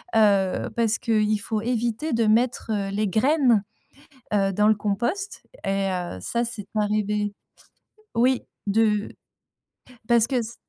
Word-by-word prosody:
heu, 200 Hz, -4 st, +3 dB
parce 230 Hz, -1 st, +2 dB
que 230 Hz, -, -4 dB
il 210 Hz, 0 st, +2 dB
faut 215 Hz, +1 st, -2 dB
éviter 240 Hz, +5 st, -1 dB
de 230 Hz, 0 st, +2 dB
mettre, 225 Hz, +1 st, +1 dB
heu, 200 Hz, -2 st, -1 dB
les 210 Hz, +1 st, 0 dB
graines, 240 Hz, -, +3 dB, 0.7 s
heu, 195 Hz, -1 st, +2 dB
dans 210 Hz, +2 st, +3 dB
le 220 Hz, -, +5 dB
compost, 235 Hz, -, -2 dB, 0.2 s
et 195 Hz, 0 st, 0 dB
heu, 175 Hz, -, -4 dB
ça, 235 Hz, -, 0 dB
c'est 230 Hz, -4 st, -5 dB
arrivé, 210 Hz, -1 st, 0 dB, 0.8 s
oui, 250 Hz, +2 st, +3 dB, 0.3 s
de 210 Hz, 0 st, +2 dB, 1.0 s
parce 235 Hz, -1 st, +4 dB
que 260 Hz, -, -2 dB
s 230 Hz, 0 st, -3 dB
215 Hz, 140 wpm, -24 LUFS, 205-235 Hz, 1.0 s, le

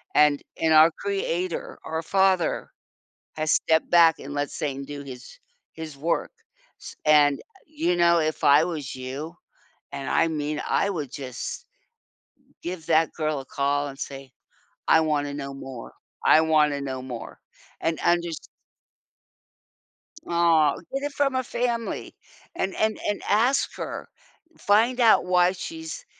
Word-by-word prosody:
and 150 Hz, -1 st, +4 dB, 0.2 s
in 160 Hz, -1 st, +1 dB
our 155 Hz, +1 st, +8 dB
Creator, 185 Hz, -3 st, -3 dB
our 160 Hz, 0 st, -3 dB
Father 190 Hz, -1 st, +1 dB, 0.7 s
has 155 Hz, 0 st, -1 dB
stepped 160 Hz, 0 st, +2 dB
back 170 Hz, -2 st, +6 dB
and 145 Hz, +1 st, -7 dB
let 145 Hz, 0 st, -2 dB
Satan 140 Hz, -2 st, -4 dB
do 145 Hz, 0 st, -7 dB
his 130 Hz, -, -11 dB, 0.3 s
his 160 Hz, -3 st, -8 dB
work, 165 Hz, +4 st, -1 dB, 0.5 s
s -, -, -10 dB
and, 145 Hz, -2 st, +5 dB
uh, -, -, -13 dB, 0.2 s
you 295 Hz, -, -1 dB
know 170 Hz, -1 st, +4 dB
if 155 Hz, 0 st, -2 dB
I 145 Hz, +2 st, +7 dB
was 155 Hz, -8 st, -5 dB
you 135 Hz, +6 st, -6 dB, 0.6 s
and 140 Hz, -1 st, -5 dB
I 165 Hz, -, +3 dB
mean, 150 Hz, -1 st, -3 dB
I 200 Hz, -, +1 dB
would 150 Hz, -8 st, -4 dB
just 130 Hz, -4 st, -6 dB, 1.0 s
give 175 Hz, -2 st, -6 dB
that 160 Hz, 0 st, +3 dB
girl 155 Hz, -2 st, -1 dB
a 135 Hz, -, -9 dB
call 145 Hz, +2 st, -1 dB
and 135 Hz, 0 st, -9 dB
say, 135 Hz, -1 st, -7 dB, 0.6 s
"I 160 Hz, -, +5 dB
want 150 Hz, -2 st, 0 dB
to 140 Hz, -, -5 dB
know 140 Hz, -1 st, -6 dB
more. 130 Hz, -3 st, -9 dB, 0.3 s
I 155 Hz, -, +7 dB
want 155 Hz, -2 st, +3 dB
to 140 Hz, -, -3 dB
know 130 Hz, -2 st, -4 dB
more." 125 Hz, -3 st, -8 dB, 0.4 s
And 165 Hz, 0 st, -1 dB
and 175 Hz, 0 st, +3 dB
just 170 Hz, -2 st, -7 dB, 1.8 s
Aw, 165 Hz, -4 st, +3 dB, 0.2 s
get 275 Hz, -, -2 dB
it 290 Hz, -, -2 dB
from 275 Hz, -2 st, 0 dB
a 260 Hz, -, +1 dB
family. 235 Hz, -1 st, -3 dB, 0.4 s
And 190 Hz, -, -2 dB
and 220 Hz, 0 st, +1 dB
and 205 Hz, -, -1 dB
ask 240 Hz, +7 st, +2 dB
her. -, -, -6 dB, 0.5 s
Find 230 Hz, +5 st, +2 dB
out 225 Hz, -5 st, +5 dB
why 180 Hz, 0 st, +4 dB
she's 325 Hz, -, -7 dB
160 Hz, 150 wpm, -25 LUFS, 145-180 Hz, 1.8 s, our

